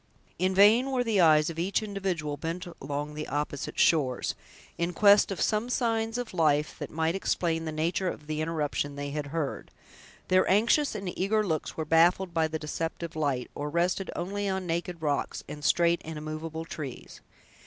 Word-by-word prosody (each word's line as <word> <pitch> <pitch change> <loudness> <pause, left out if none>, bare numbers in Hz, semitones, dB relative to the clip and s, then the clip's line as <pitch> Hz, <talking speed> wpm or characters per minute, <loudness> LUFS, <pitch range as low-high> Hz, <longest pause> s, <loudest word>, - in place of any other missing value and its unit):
In 185 +1 +1
vain 220 +7 +6
were 255 -2 +1
the 220 -5 +2
eyes 155 -1 +5
of 165 - -7
each 195 +5 0
individual 190 -8 -2
bent 165 +5 -4 0.2
along 145 +2 -4
the 150 0 -5
opposite 145 -1 -3
shores, 135 -6 +2 0.4
in 170 +1 -2
quest 205 +3 +6
of 195 - -4
some 215 +3 +1
signs 225 -2 0
of 245 -4 -5
life, 155 -3 +2
that - - -5
might 160 +1 0
explain 165 -3 -1
the 160 - -3
nature 170 +4 0
of 150 - -7
the 155 0 -3
interruption 150 -3 -2
they 145 0 -4
had 145 0 -3
heard. 150 -1 -3 0.6
Their 185 0 +3
anxious 230 +8 +3
and 195 -4 -4
eager 210 +3 +1
looks 160 -5 -2
were 160 - -2
baffled 170 +3 +3
by 160 -1 +2
the 160 0 -3
deceptive 165 +2 -4
light, 140 -5 -1
or 145 +1 -4
rested 175 +4 0
only 200 +3 -2
on 190 -1 -2
naked 170 0 -3
rocks, 145 -2 -1
and 150 0 -8
straight 170 +2 +3
and 160 0 -6
immovable 155 +1 -5
trees. 140 -6 -8
165 Hz, 180 wpm, -28 LUFS, 155-190 Hz, 0.6 s, vain